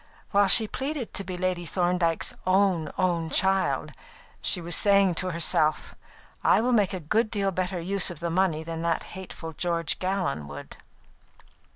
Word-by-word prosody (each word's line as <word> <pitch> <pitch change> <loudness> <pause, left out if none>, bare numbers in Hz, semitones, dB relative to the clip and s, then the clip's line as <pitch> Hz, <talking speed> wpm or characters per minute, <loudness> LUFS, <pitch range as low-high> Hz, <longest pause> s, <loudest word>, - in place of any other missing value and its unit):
While 200 -1 +4
she 220 +3 +8
pleaded 270 +1 -4
to 195 - -3
be 185 -1 -6
Lady 180 -1 -1
Thorndyke's 175 -1 0
"own, 185 -5 +2
own 170 -3 0
child," 190 +3 +1 0.5
she 185 - +2
was 170 0 -1
saying 200 -2 +4
to 185 - -3
herself: 160 -2 +1 0.5
"I - - +4
will 245 +3 +1
make 205 -5 +2
a - - -4
good 215 +8 0
deal 200 -3 -1
better 185 0 -2
use 195 +3 0
of 175 -4 -8
the 170 -1 -3
money 170 -3 +1
than 165 0 -6
that 170 -1 -1
hateful 175 -3 -8
George 170 -2 -1
Gallon 185 - -2
would." 70 0 -10
180 Hz, 165 wpm, -26 LUFS, 165-195 Hz, 0.5 s, she